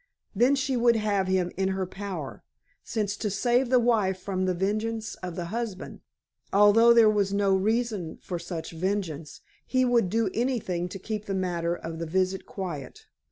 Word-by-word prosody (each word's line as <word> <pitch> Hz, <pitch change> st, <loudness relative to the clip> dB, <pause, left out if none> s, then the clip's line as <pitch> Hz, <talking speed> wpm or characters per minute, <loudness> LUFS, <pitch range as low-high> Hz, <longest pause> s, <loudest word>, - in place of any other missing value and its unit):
Then 245 Hz, +7 st, +4 dB
she 270 Hz, -1 st, -1 dB
would 235 Hz, -1 st, +4 dB
have 205 Hz, -3 st, 0 dB
him 185 Hz, -1 st, +1 dB
in 190 Hz, 0 st, +1 dB
her 190 Hz, -, -1 dB
power, 185 Hz, -6 st, -6 dB, 0.4 s
since 205 Hz, -3 st, -2 dB
to 210 Hz, -, -2 dB
save 240 Hz, +5 st, +1 dB
the 255 Hz, -, +5 dB
wife 220 Hz, -6 st, +2 dB
from 185 Hz, 0 st, -2 dB
the 185 Hz, -1 st, 0 dB
vengeance 215 Hz, +4 st, -2 dB
of 180 Hz, -2 st, -5 dB
the 175 Hz, -, -3 dB
husband, 225 Hz, -5 st, -4 dB, 0.5 s
although 210 Hz, +4 st, +6 dB
there 230 Hz, -2 st, +7 dB
was 205 Hz, -2 st, +2 dB
no 200 Hz, -1 st, +2 dB
reason 210 Hz, -4 st, -1 dB
for 175 Hz, -2 st, -5 dB
such 170 Hz, -1 st, -6 dB
vengeance, 165 Hz, -3 st, -3 dB, 0.2 s
he 255 Hz, 0 st, +1 dB
would 235 Hz, -6 st, +3 dB
do 220 Hz, -1 st, +1 dB
anything 215 Hz, -8 st, -1 dB
to 195 Hz, -, -6 dB
keep 210 Hz, +2 st, -5 dB
the 195 Hz, -, -2 dB
matter 175 Hz, -2 st, -1 dB
of 165 Hz, -1 st, -7 dB
the 165 Hz, -, -3 dB
visit 185 Hz, +3 st, 0 dB
quiet. 170 Hz, -9 st, -6 dB
195 Hz, 175 wpm, -27 LUFS, 180-225 Hz, 0.5 s, there